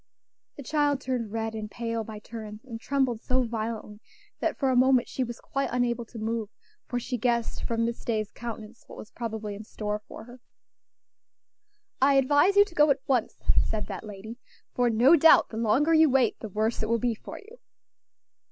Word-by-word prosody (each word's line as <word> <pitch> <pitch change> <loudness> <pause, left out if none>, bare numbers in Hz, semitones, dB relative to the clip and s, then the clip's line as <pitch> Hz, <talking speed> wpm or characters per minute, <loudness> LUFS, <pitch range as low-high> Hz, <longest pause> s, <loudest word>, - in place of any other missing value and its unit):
The 280 - -9
child 290 -1 +1
turned 250 -5 -3
red 225 0 -3
and 215 -1 -5
pale 230 0 -3
by 220 0 -8
turns, 215 +1 -9
and 230 -3 -8
trembled 265 -5 0
so 255 0 +1
violently 220 -2 -4 0.4
that - - -1
for 270 -2 +1
a - - +1
moment 255 -1 +4
she 260 - -2
was 240 -1 -6
quite 275 0 -2
unable 245 -1 0
to 230 - -12
move; 220 -1 -2 0.4
for 245 - -2
she 245 0 -4
guessed 235 0 -1
from 230 0 0
Miss 235 0 -4
Day's 215 -3 -2
countenance 230 -1 -8
what - - -12
was 215 - -10
probably 220 -3 -5
in 205 +2 -8
store 210 -1 -4
for - - -10
her. 245 +2 -14 1.6
"I 275 +1 +5
advise 290 +8 +4
you 405 0 +7
to 410 - -15
go 300 -2 +4
at 275 -1 +1
once," 250 -5 0 0.3
said 215 -1 -2
that 195 -3 -6
lady, 215 +3 -9 0.3
"for 245 -1 +2
no 240 +8 +6
doubt 325 +1 +6
the 220 - -7
longer 245 +8 +2
you 320 -1 +6
wait 260 -3 +2
the 220 - -7
worse 215 +3 -1
it 215 - -2
will 230 - +3
be 235 +1 0
for 220 - -9
you." 450 +4 -15
235 Hz, 195 wpm, -27 LUFS, 220-260 Hz, 1.6 s, you